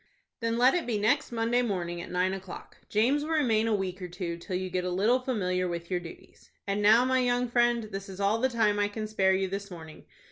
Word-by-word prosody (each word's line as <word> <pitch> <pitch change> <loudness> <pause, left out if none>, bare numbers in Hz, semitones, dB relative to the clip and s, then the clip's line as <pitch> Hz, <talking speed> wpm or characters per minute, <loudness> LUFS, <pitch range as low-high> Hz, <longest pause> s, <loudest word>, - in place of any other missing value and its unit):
"Then 230 0 -1
let 250 +2 +5
it 350 -6 -1
be 230 -3 0
next 235 +8 +1
Monday 235 +1 +1
morning, 175 -7 -3
at - - -9
nine 180 +1 0
o'clock. 190 -1 -9
James 245 +8 +2
will 320 +2 -2
remain 230 -8 +2
a 220 - +2
week 190 -1 -4
or 180 - -4
two, 175 -1 -5
till 170 +2 -6
you 185 +1 -2
get 180 0 -2
a 180 - -2
little 210 +8 +2
familiar 185 -8 -1
with 170 0 -5
your 180 - +1
duties. 170 -2 -13 0.2
And 200 +1 -1
now, 220 +4 +6
my 260 0 +2
young 245 0 +1
friend, 240 -1 +2
this 195 -2 -7
is 190 0 -9
all 200 +3 +2
the 260 - +3
time 215 -4 +1
I 205 - +2
can 215 +1 -5
spare 190 -3 +2
you 190 0 0
this 200 +2 -5
morning. 160 -3 -11
205 Hz, 245 wpm, -28 LUFS, 185-240 Hz, 0.2 s, now